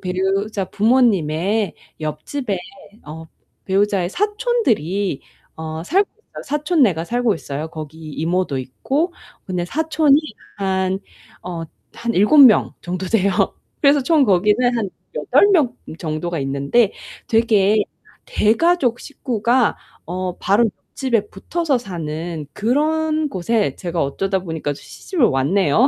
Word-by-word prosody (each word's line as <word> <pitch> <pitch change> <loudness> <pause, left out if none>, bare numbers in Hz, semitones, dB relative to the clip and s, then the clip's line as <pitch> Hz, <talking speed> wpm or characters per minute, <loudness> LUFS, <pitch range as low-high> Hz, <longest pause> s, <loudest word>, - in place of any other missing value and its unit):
배우자 195 +2 -1
부모님의 205 -4 +2 0.3
옆집에 190 - -3 0.5
어 160 +2 -8 0.4
배우자의 195 -2 +1
사촌들이 260 - 0 0.4
어 160 0 -5
살고 385 - +2
있어요. 445 - -12
사촌네가 285 - +1
살고 240 +2 +1
있어요. 150 -1 -5
거기 155 -1 -8
이모도 165 0 -1
있고. 270 - -2 0.3
근데 180 -2 -2
사촌이 305 - +2 0.4
한 190 -1 0 0.4
어 170 -2 -5 0.3
한 235 0 -2
7 210 +11 +4
명 255 -7 +7
정도 180 +1 -4
돼요. 200 -1 +2 0.5
그래서 285 0 +5
총 310 +2 +3
거기는 210 +5 +3
한 205 -4 -2 0.3
8 - - +4
명 300 -10 +3 0.2
정도가 165 +1 -3
있는데 140 +11 +1 0.4
되게 220 -3 +3 0.4
대가족 270 - +2
식구가 245 -3 0 0.3
어 180 +1 -3
바로 205 +5 +3 0.2
옆집에 235 -6 -1
붙어서 300 - -1
사는 165 -6 -5
그런 310 +6 +1
곳에 210 0 0
제가 175 -2 -2
어쩌다 190 +8 -1
보니까 160 -4 -3
시집을 325 - -2
왔네요. 155 - +3
200 Hz, 245 characters per minute, -20 LUFS, 175-255 Hz, 0.5 s, 명